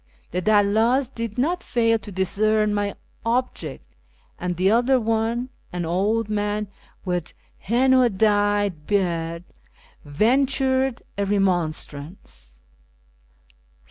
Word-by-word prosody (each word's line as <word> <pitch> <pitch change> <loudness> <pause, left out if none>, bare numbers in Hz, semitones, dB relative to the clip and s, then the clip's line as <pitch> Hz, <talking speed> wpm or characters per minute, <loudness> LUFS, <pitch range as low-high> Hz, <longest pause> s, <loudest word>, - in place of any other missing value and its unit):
The 180 - -1
dalldls 220 +6 +2
did 230 -1 -5
not 335 +8 0
fail 230 -2 +1
to 210 - -10
discern 210 +3 +1
my 205 -1 -1 0.3
object, 230 - -2 0.5
and 180 -1 -3
the 185 +2 +3
elder 245 +4 +3
one 225 +2 -1
— - - -37
an 175 -1 -3
old 205 +6 0
man 210 -1 -2 0.4
with 180 -3 -2 0.3
henna 255 +3 +3
dyed 205 -5 +1
beard 170 -4 -1 0.4
— - - -30
ventured 260 - +1 0.2
a 200 - +1
remonstrance. 155 - -3
205 Hz, 110 wpm, -23 LUFS, 180-235 Hz, 0.5 s, the